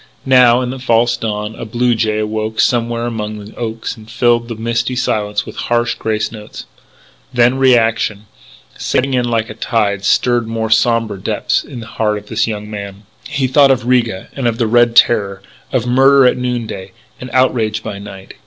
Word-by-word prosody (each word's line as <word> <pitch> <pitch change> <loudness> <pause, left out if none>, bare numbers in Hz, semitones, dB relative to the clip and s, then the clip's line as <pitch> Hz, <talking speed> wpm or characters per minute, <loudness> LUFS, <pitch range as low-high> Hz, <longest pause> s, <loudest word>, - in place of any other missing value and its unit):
Now, 125 -2 +5
in 125 -1 -3
the 130 - -7
false 120 -1 +2
dawn, 105 -2 -4
a - - -8
blue 120 +2 0
jay 110 -1 0
awoke 110 0 -3
somewhere 120 -1 +1
among 110 -2 -4
the 105 +1 -11
oaks 115 0 -4
and 110 -1 -15
filled 120 0 +1
the 115 - -5
misty 115 +2 -2
silence 105 -4 -1
with - - -10
harsh 120 0 0
grace 110 -1 -2
notes. 105 -2 -10 0.7
Then 125 +1 +2
reaction, 115 -5 +2 0.5
setting 135 +1 -1
in 125 -1 +1
like 115 -2 -1
a - - -6
tide, 105 -3 -1
stirred 120 +2 +2
more 110 -1 -3
sombre 115 -2 +2
depths - - -1
in 125 -4 -9
the - - -8
heart 110 -2 -1
of 105 - -10
this 110 0 0
young 105 -2 -5
man. 100 -1 -8 0.2
He 140 -1 -1
thought 140 +2 +4
of 130 -2 +1
Riga; 120 -6 0
and 135 -3 -2
of 115 -1 -1
the 120 - +1
Red 120 +1 +3
Terror; 100 -5 +3 0.3
of 125 -3 0
murder 135 +2 +5
at 125 - +4
noon 125 -2 -2
day, 95 -3 -8 0.3
and 125 - -8
outrage 115 -4 +1
by 100 - -6
night. 95 -1 -10
115 Hz, 190 wpm, -16 LUFS, 110-120 Hz, 0.7 s, Now